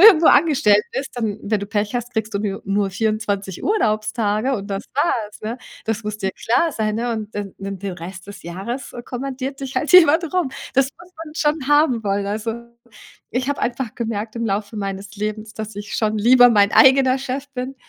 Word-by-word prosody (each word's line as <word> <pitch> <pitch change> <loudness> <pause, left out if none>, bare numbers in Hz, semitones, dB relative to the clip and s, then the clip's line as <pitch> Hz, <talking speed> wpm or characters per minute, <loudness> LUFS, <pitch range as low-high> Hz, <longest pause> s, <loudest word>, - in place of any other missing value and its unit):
irgendwo 340 -7 +8
angestellt 270 -9 +5
bist, 270 0 -3
dann, 220 -3 -2
wenn 210 0 0
du 200 - -5
Pech 205 0 -1
hast, 245 +1 -5
kriegst 220 -1 -2
du - - +1
nu 200 -1 -3
nur 195 0 0
24 200 -2 -2
Urlaubstage 215 - +1
und 200 -3 -5
das 195 +1 -3
war's, 230 -8 0
ne? 230 +4 -4 0.3
Das 225 0 -2
muss 210 0 -4
dir 190 -2 -1
klar 245 - +1
sein, 215 -4 -1
ne? 235 +2 -1
Und 215 -1 -5
dann 205 -2 -4
dann 195 -1 -6
den 200 -1 -4
Rest 185 +2 -9
des 200 - -10
Jahres 200 +10 -5
kommandiert 265 +1 -5
dich 270 -1 -5
halt 300 - -1
jemand 335 -2 +8
rum. 360 -7 +1 0.2
Das 270 0 +3
muss 360 +1 -17
man 305 0 -12
schon 300 -3 0
haben 290 -6 +3
wollen. 200 0 0
Also, 215 +3 -2 0.8
ich 255 +3 -1
habe 285 - -1
einfach 240 -1 -2
gemerkt 225 -1 -3
im 230 -1 -1
Laufe 205 +2 -2
meines 200 +1 -5
Lebens, 215 +1 -4
dass 220 -1 -6
ich 205 0 -6
schon 215 -1 0
lieber 245 +3 +7
mein 205 -2 +4
eigener 265 0 +6
Chef 270 +2 -4
bin, 255 +1 -4
220 Hz, 200 wpm, -21 LUFS, 205-265 Hz, 0.8 s, irgendwo